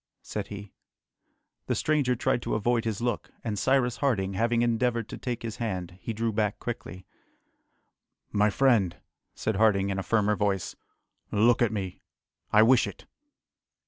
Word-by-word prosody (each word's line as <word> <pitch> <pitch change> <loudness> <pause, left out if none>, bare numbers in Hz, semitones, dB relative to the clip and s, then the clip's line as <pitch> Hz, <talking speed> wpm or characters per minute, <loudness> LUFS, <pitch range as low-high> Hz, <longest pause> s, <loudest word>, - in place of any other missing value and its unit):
said 105 -2 -4
he. 100 -1 -9 0.9
The - - +1
stranger 145 -5 +1
tried 125 0 0
to - - -2
avoid 115 +2 +1
his 110 -1 -2
look, 120 0 -2
and 105 -3 -2
Cyrus 130 0 +2
Harding, 100 -9 0
having 115 +4 +1
endeavoured 120 -1 +1
to - - -6
take 120 -3 -4
his 115 0 -5
hand, 95 -6 -4
he - - -4
drew 115 0 -1
back 105 -1 0
quickly. 95 -6 -6 1.3
"My 105 +1 +3
friend," 105 -7 +2 0.4
said 110 -3 -1
Harding 100 -2 +3
in 95 - -2
a - - -1
firmer 105 0 +2
voice, 100 -2 -1 0.5
"look 115 +4 +3
at 120 -2 +3
me, 95 -4 -4 0.5
I 105 +1 +7
wish 120 +1 +5
it!" - - -9
110 Hz, 155 wpm, -27 LUFS, 100-120 Hz, 1.3 s, I